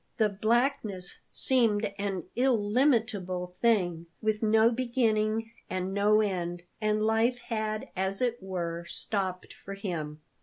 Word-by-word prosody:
The 215 -1 +3
blackness 215 -3 0
seemed 225 -5 +3
an 195 -3 -2
illimitable 215 -7 +1
thing, 175 -8 +2
with 215 -1 0
no 220 +1 +4
beginning 225 -3 0 0.2
and 185 +1 -2
no 210 +2 +4
end, 175 -4 -2 0.2
and 215 0 +1
life 225 +3 +2
had, 215 -3 -3
as 190 +1 -1
it 240 -2 0
were, 170 -3 -3
stopped 185 -1 -3
for 195 - -9
him. 155 -6 -4
210 Hz, 120 wpm, -29 LUFS, 185-225 Hz, 0.2 s, no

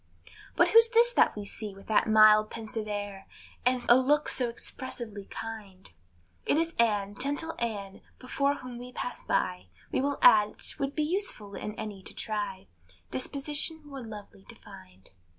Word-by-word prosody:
But - - +4
who's 460 0 +7
this 475 +1 +4
that - - +3
we 205 -1 -6
see, 205 0 -5
with 195 - -14
that 220 0 +2
mild 215 0 +6
pensive 220 -1 -6
air, 205 -2 -5 0.4
And 250 -1 +1
a 240 - +8
look 290 +4 +2
so 250 -2 -1
expressively 235 -3 -7
kind? 205 - -9 0.5
It - - +1
is 330 +1 0
Ann, 205 -3 +1
gentle 290 +7 -2
Ann, 205 -4 -4 0.2
before 280 +2 -1
whom 250 -3 -9
we 250 +1 -9
pass 245 - -5
by, 90 0 -1 0.2
We - - 0
will 280 +1 -1
add 210 -1 +6
't - - -4
would 275 0 -2
be 305 - +1
useless 300 - -3
in 210 - -5
any 210 -3 -7
to - - -10
try 205 -3 -4 0.5
Disposition 295 - +1
more 275 -2 -8
lovely 205 - -11
to - - -11
find. 95 0 -14
225 Hz, 170 wpm, -29 LUFS, 205-275 Hz, 0.5 s, a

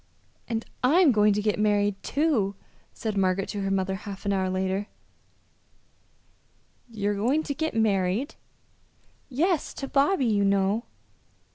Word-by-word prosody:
"And 225 -1 -3 0.2
I'm 310 +4 +5
going 210 -2 +4
to 210 +1 -1
get 210 0 0
married, 205 -1 +2
too," 260 -10 0 0.4
said 220 -2 -4
Margaret 190 0 +1
to 205 - -3
her 195 - -1
mother 190 0 0
half 195 0 -8
an 200 - +1
hour 190 -1 0
later. 190 +2 -1 2.0
"You're 205 -2 -1
going 250 +10 +1
to 285 - -3
get 315 0 -3
married!" 210 - +1 1.0
"Yes; 320 +5 0
to 275 - -5
Bobby, 280 +2 +2
you 210 -3 +2
know." 200 +3 +1
210 Hz, 135 wpm, -26 LUFS, 195-260 Hz, 2.0 s, I'm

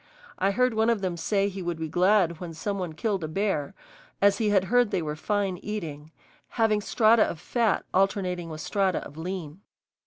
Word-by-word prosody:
I 195 - +2
heard 250 +4 +2
one 220 +1 +2
of 230 -4 +1
them 185 -3 -1
say 195 +4 0
he 195 -1 -5
would 175 -2 -3
be 160 0 -3
glad 180 0 +2
when 170 -3 -7
some 200 +4 -3
one 175 -3 -4
killed 195 +2 -2
a - - -2
bear, 155 -4 -1 0.4
as 200 0 +4
he 215 -2 +2
had 195 -2 +3
heard 245 +3 +3
they 190 -5 -1
were 150 -1 -3
fine 195 +2 -1
eating, 160 -8 -5 0.4
having 220 -3 +1
strata 220 +1 +4
of 170 - +1
fat 225 +4 0
alternating 185 -3 0
with 155 -1 -7
strata 190 +2 0
of 145 - -11
lean. 170 0 -6
190 Hz, 195 wpm, -26 LUFS, 165-210 Hz, 0.4 s, as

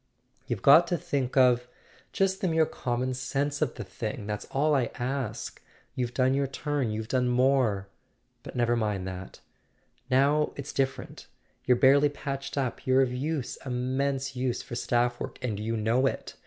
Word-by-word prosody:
"You've - - -3
got 160 +5 +8
to 175 - 0
think 135 -3 -2
of—just 130 +9 +1
the 190 - +1
mere 160 -1 +3
common 125 -2 -2
sense 140 +3 -2
of 150 -6 0
the 120 - -5
thing. 105 +3 -5
That's 105 0 -4
all 150 +3 +1
I 135 -4 +3
ask. 125 -2 -4 0.3
You've 125 -1 -3
done 130 0 +3
your 140 0 +1
turn; 140 -2 -2
you've 110 +1 -3
done 125 +1 +1
more. 125 -6 +2 0.5
But - - -10
never 120 -1 +2
mind 105 -5 -1
that. 95 0 -8 0.7
Now 140 +3 +3
it's 140 0 -6
differ¬ 135 -1 0
ent. - - -14 0.4
You're 125 -1 +4
barely 140 +3 +5
patched 140 -1 -5
up: 135 0 -2
you're 130 +1 +5
of 125 -1 -2
use, 140 +1 -3
immense 130 +2 -1
use, 125 -1 -1
for - - -10
staff 120 0 0
work, - - -6
and 110 -5 -2
you 115 +2 -2
know 115 +5 +2
it. - - -4
130 Hz, 170 wpm, -28 LUFS, 120-140 Hz, 0.7 s, got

